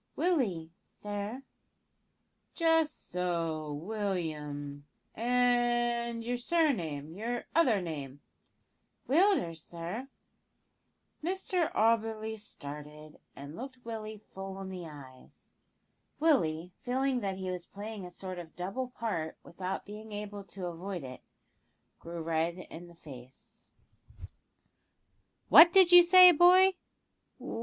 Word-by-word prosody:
"Willie, 215 - 0 0.2
sir." 205 +5 -6 1.1
"Just 325 -2 +1
so, 165 -4 -2
William; 150 -6 -4 0.3
and 240 -1 +1
your 245 +1 -2
surname 190 - 0
your 235 +5 -4
other 240 - +3
name?" 145 -5 -6 0.9
"Willders, 280 - +2
sir." 175 - -6 1.2
Mr 365 -1 -1
Auberly 220 0 +1
started, 150 -4 -10 0.2
and 140 +3 -9
looked 255 +2 -9
Willie 220 -2 -6
full 195 -1 -9
in 190 -1 -6
the 180 -3 -7
eyes. 135 -4 -14 0.7
Willie, 180 - +1
feeling 260 +1 0
that 195 -4 -3
he 185 -1 -4
was 180 -1 -6
playing 205 0 -7
a 180 - -7
sort 185 0 -7
of 165 -2 -11
double 195 +9 -4
part 210 -10 -4
without 185 +2 -5
being 215 +2 -10
able 205 -1 -6
to 195 -2 -7
avoid 175 0 -5
it, 130 -1 -9 0.8
grew 170 0 -7
red 165 +1 -1
in 175 -1 -10
the 170 - -16
face. 130 -5 -14 1.8
"What 345 +1 +10
did 370 -1 +6
you 355 0 +11
say, 365 +1 +9
boy?" 365 +3 +6
200 Hz, 110 wpm, -31 LUFS, 165-245 Hz, 1.8 s, you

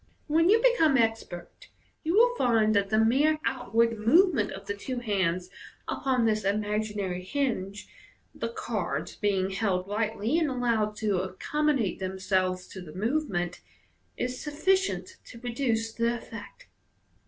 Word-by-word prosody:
When 325 +3 +3
you 440 +3 +6
become 325 - +4
expert, 225 -7 -2 0.4
you 330 +3 0
will 485 +3 +6
find 225 - +3
that 200 -1 +2
the 215 - +2
mere 270 +8 +4
outward 230 -3 +1
movement 255 - +4
of 195 +1 -8
the 200 - -2
two 250 +5 -5
hands 185 -6 -1 0.4
upon 255 -3 0
this 215 -1 +1
imaginary 205 -2 -1
hinge 210 -4 -2 0.5
(the 230 - -4
cards 180 -11 -3
being 195 -2 0
held 190 -2 0
lightly, 220 +6 0
and 315 -3 +1
allowed 230 -5 0
to 205 -4 0
accommodate 250 - -1
themselves 185 -1 -1
to 190 - -8
the 155 -4 -10
movement) 195 - -1 0.6
is 250 0 -3
sufficient 375 +6 0
to 235 - -12
produce 230 -2 -1
the 235 +1 0
effect. - - -11
225 Hz, 135 wpm, -28 LUFS, 195-265 Hz, 0.6 s, you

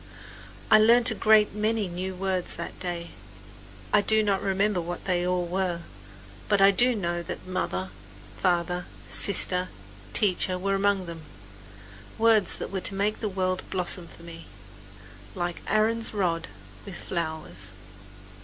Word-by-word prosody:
I 215 - +9
learned 235 +2 +6
a - - 0
great 215 0 +4
many 215 0 0
new 185 +2 -4
words 185 -1 -1
that 170 - -6
day. 175 -2 -4 0.8
I 210 - +6
do 220 +1 +3
not 200 -2 +1
remember 195 -1 +1
what 175 +1 -6
they 180 -1 +1
all 180 -1 0
were; 175 -1 -1 0.7
but 205 -1 +3
I 195 0 +7
do 245 +5 +2
know 175 -4 -2
that 170 - -7
mother, 95 - -2 0.4
father, 180 -1 0 0.2
sister, 180 - +2 0.4
teacher 185 - +1
were 195 +2 -1
among 195 -1 +1
them 165 -1 -8 1.0
words 220 -4 +4
that - - -5
were 190 -1 -2
to 195 - -1
make 205 +2 0
the 215 - -2
world 185 -1 -1
blossom 180 -1 -1
for 165 - -13
me, 165 -1 -10 0.9
"like 175 0 -3
Aaron's 220 +1 +1
rod, 170 -4 0 0.4
with 195 -3 -8
flowers." 160 -4 -4
185 Hz, 145 wpm, -27 LUFS, 175-205 Hz, 1.0 s, I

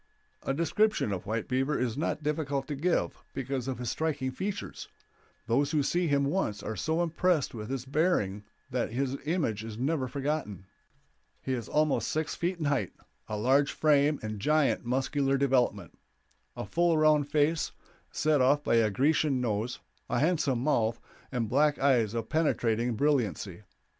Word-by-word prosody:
A - - -2
description 170 - +1
of 95 -2 -4
White 110 +1 -2
Beaver 135 +3 0
is 120 -2 -1
not 155 0 -2
difficult 145 -2 -1
to 145 - -2
give, 170 +6 -1
because 135 -1 -3
of 130 - -2
his 125 -1 -3
striking 145 -5 -1
features; 195 +9 -5 0.6
those 130 +5 +2
who 150 -3 +1
see 175 +5 +1
him 140 -2 +2
once 140 - -1
are 110 - -4
so 160 - 0
impressed 170 -2 +1
with 110 -1 -6
his 130 -2 -3
bearing 135 - 0 0.3
that 125 -1 -1
his 135 +2 -1
image 150 - -1
is 110 -1 -7
never 135 +1 0
forgotten. 135 - -3 0.7
He 130 - -3
is 120 -3 -4
almost 155 -1 +1
six 155 0 -1
feet 175 +2 -2
in 160 - -3
height, 140 -10 0 0.3
of 105 -1 -3
large 135 +4 +3
frame 150 -1 +3
and 110 -1 -4
giant 150 +5 +2
muscular 135 +2 0
development; 125 - +1 0.6
a - - -5
full 170 - +2
round 155 -2 +3
face, 155 +2 +1 0.4
set 150 -3 +2
off 145 +3 +3
by 115 - +3
a 110 -2 +4
Grecian 140 +4 +2
nose, 115 0 -2 0.3
a - - 0
handsome 140 -4 +1
mouth, 115 -6 +1 0.3
and 120 -4 -1
black 145 +5 +3
eyes 120 -6 +2
of 115 -1 -2
penetrating 120 -7 +1
brilliancy. 105 - 0
135 Hz, 165 wpm, -29 LUFS, 115-155 Hz, 0.7 s, a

